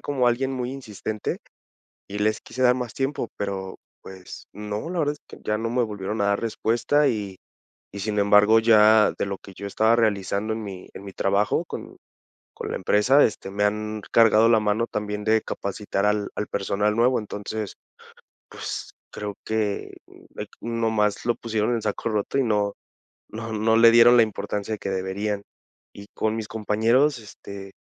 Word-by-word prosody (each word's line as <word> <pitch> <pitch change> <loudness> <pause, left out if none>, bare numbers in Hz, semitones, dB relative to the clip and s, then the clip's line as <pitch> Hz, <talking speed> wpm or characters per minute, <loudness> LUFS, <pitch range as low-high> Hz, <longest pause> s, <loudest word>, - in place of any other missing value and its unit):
como 130 -4 0
alguien 135 +3 0
muy 125 0 -3
insistente, 110 -5 -5 0.7
y 100 - -6
les 110 +1 +1
quise 130 - -7
dar 125 0 +6
más 125 -4 -4
tiempo. 135 -3 -2
Pero, 95 -2 -4 0.3
pues, 95 -1 -11
no, 105 +8 -5
la 180 -1 -2
verdad 145 -1 +1
es 150 - -17
que - - -12
ya 105 0 0
no 115 0 -2
me 120 0 +1
volvieron 105 0 -4
a - - +2
dar 100 0 +2
respuesta 115 +6 +1
y 105 -6 -2 0.6
y, 100 - -6
sin 105 +1 -2
embargo, 105 +2 +6
ya 110 -1 +6
de - - 0
lo 100 -1 -4
que 95 - -14
yo 100 - -7
estaba 110 +3 +3
realizando 105 -1 0
en 110 0 -4
mi 95 -3 -8
en 100 - -10
mi 100 - -8
trabajo 100 +1 +1
con - - -8 0.6
con - - -6
la - - -2
empresa, 115 +9 +4
este, 100 -3 -2
me 100 +1 0
han 105 0 -1
cargado 115 0 +6
la 110 -2 +5
mano 105 +2 +1
también 105 0 -3
de 110 0 +3
capacitar 100 0 -3
al 105 -1 0
al 105 - -3
personal 105 +2 0
nuevo. 125 +2 +3
Entonces, 105 0 -5 0.7
pues, - - -6 0.2
creo 105 -1 -5
que, 110 -2 -2
mm, - - -17
eh, - - -5
qu - - -8
nomás 110 -3 0
lo 120 -1 +2
pusieron 110 0 -1
en 115 - -1
saco 105 +2 -2
roto 105 +5 -1
y 135 - +3
no 105 -3 +1 0.6
no 110 +1 -6
no 110 +1 +2
le 115 0 +8
dieron 120 +1 +7
la 115 - +7
importancia 105 0 -3
de - - -7
que 100 - -4
deberían. 100 +2 -2 0.5
Y 100 - -11
con 110 0 0
mis 110 -2 -5
compañeros, 115 +6 +2
este, 100 -2 -10
105 Hz, 185 wpm, -24 LUFS, 100-115 Hz, 0.7 s, le